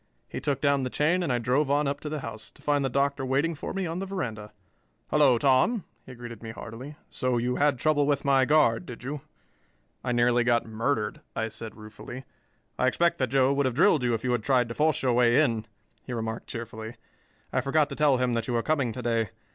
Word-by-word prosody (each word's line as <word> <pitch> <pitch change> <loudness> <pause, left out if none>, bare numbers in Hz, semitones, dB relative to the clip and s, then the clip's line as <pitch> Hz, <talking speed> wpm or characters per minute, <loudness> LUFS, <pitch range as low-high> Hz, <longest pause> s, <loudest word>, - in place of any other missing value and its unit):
He - - -6
took 140 -2 -1
down 140 -1 +3
the 130 - -2
chain 160 +8 +1
and 170 -6 -1
I 125 - +2
drove 130 +5 +1
on 145 +1 +2
up 140 +1 -2
to 150 - -6
the 150 -1 -4
house, 110 -2 -7
to - - -21
find 145 -1 +2
the 135 - 0
Doctor 140 +1 0
waiting 140 +6 +1
for 155 - -6
me 190 -1 -2
on 165 +1 -3
the 195 - -4
veranda. 110 - -4 0.6
"Hello, 140 -5 +5
Tom," 140 - +3 0.2
he 130 - -9
greeted 120 -2 -9
me 115 - -7
heartily. 115 +6 -8 0.2
"So 125 -1 0
you 125 +1 0
had 145 -2 +2
trouble 145 +1 +2
with 145 -1 0
my 135 -1 +4
guard, 130 -6 +3
did 125 -1 -9
you?" 140 +2 -4 0.8
"I 125 - -1
nearly 120 0 +3
got 120 -1 +2
murdered," 110 +1 -2
I 110 0 -1
said 110 0 -9
ruefully. 110 +4 -9 0.5
"I - - +3
expect 170 0 +2
that 130 -2 0
Joe 135 +1 +3
would 140 -1 +1
have 125 - -2
drilled 160 -2 +4
you 120 -2 +1
if 110 - -6
you 125 - 0
had 120 -2 +1
tried 125 0 +2
to - - -4
force 155 +2 +1
your 125 -2 +2
way 120 +1 +4
in," 115 -7 +1 0.4
he 125 - -6
remarked 115 -1 -4
cheerfully. 110 -1 -7 0.6
"I 130 - +2
forgot 145 +3 +2
to - - -6
tell 145 -3 +3
him 125 -1 0
that 115 -1 -1
you 120 - -1
were 115 - +1
coming 140 -6 +1
to 125 - -6
day. 115 -2 0
130 Hz, 235 wpm, -27 LUFS, 115-145 Hz, 0.8 s, Hello